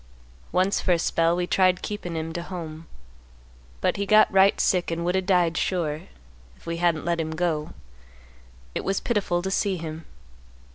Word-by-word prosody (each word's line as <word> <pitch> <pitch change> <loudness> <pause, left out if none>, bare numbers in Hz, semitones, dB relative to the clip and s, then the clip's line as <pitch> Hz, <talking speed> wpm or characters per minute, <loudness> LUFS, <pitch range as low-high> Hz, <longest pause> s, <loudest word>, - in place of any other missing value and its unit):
Once 185 +2 +1
for 180 - +2
a - - +2
spell 165 0 +1
we 180 0 -1
tried 185 0 +2
keepin' 195 -5 -5
him 160 0 -4
to 170 - -3
home, 165 -3 -7 0.9
but - - +1
he 200 - -1
got 215 -1 +5
right 195 +1 +5
sick 180 -2 +2
and 170 0 -2
would 180 +1 +1
o' 190 - +2
died 180 -3 +2
sure, 160 -5 -1 0.5
if - - -22
we 170 0 -3
hadn't 170 -2 +1
let 170 -1 0
him 160 0 -4
go; 160 -3 -2 1.0
it - - -3
was 195 0 0
pitiful 190 -6 -1
to 190 - -2
see 195 -1 0
him. 160 -1 -7
175 Hz, 180 wpm, -25 LUFS, 165-190 Hz, 1.0 s, got